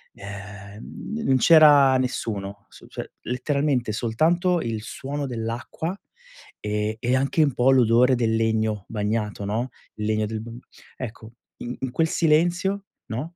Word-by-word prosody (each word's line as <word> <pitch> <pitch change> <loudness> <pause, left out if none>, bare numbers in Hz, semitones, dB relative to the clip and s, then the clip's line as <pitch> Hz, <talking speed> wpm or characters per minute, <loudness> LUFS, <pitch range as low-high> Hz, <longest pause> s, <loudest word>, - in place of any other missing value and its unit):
Ehm, 100 - -8
n - - -4
non 130 - +4
c'era 145 -3 +7
nessuno, 100 -5 -3
s - - -16
cioè, - - -7
letteralmente 130 -1 0
soltanto 165 - +1
il 110 -2 -3
suono 140 +5 -5
dell'acqua 120 - -4 0.6
e 105 +1 -2
e 125 +2 +1
anche 140 +4 +2
un 140 -4 +1
po' 125 +2 +3
l'odore 125 0 +5
del 115 -2 +1
legno 110 -2 0
bagnato, 105 -1 -2
no, 115 +5 -2 0.3
il 105 - -4
legno 110 0 +1
del 110 0 -4
bamb 115 +1 -9 0.4
ecco, 115 -2 -8 0.3
in 120 +1 -6
in 130 -2 -3
quel 165 +4 +1
silenzio, 175 +5 +1 0.3
no, 155 +10 -5
120 Hz, 145 wpm, -24 LUFS, 110-140 Hz, 0.6 s, c'era